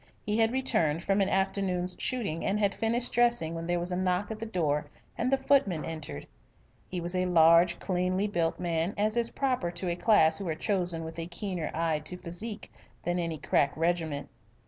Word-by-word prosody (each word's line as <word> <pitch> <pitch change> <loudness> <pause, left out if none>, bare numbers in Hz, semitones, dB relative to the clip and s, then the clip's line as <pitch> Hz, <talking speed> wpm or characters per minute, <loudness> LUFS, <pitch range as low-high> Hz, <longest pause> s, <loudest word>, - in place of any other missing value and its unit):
He 210 +1 0
had 225 0 +4
returned 170 - +1
from 195 +1 +2
an 195 - +2
afternoon's 190 -2 0
shooting, 215 -11 -2
and 205 +2 0
had 200 -2 +2
finished 235 +2 0
dressing 240 -9 +2
when 165 0 -5
there 175 0 +1
was 175 +1 -3
a - - 0
knock 185 +3 0
at 215 - -5
the 225 - -4
door 150 -8 0 0.3
and 255 +2 -1
the 270 - +4
footman 265 - +2
entered. 155 - -6 0.6
He 180 - -4
was 175 +1 -3
a 185 0 +1
large 170 0 +5
cleanly 185 +1 0
built 170 -5 -1
man, 170 +1 -1
as 215 +2 +1
is 235 -1 +1
proper 255 -10 -1
to 175 +1 -3
a 170 - 0
class 165 -5 +4
who 195 - -4
are 160 - -1
chosen 175 -2 0
with 160 +1 -7
a 165 - -4
keener 175 -1 -3
eye 165 -1 +1
to 180 +4 -6
physique 190 +6 -7 0.3
than 175 0 0
any 165 -2 -2
crack 140 0 +1
regiment. 160 -3 -1
180 Hz, 200 wpm, -29 LUFS, 165-210 Hz, 0.6 s, large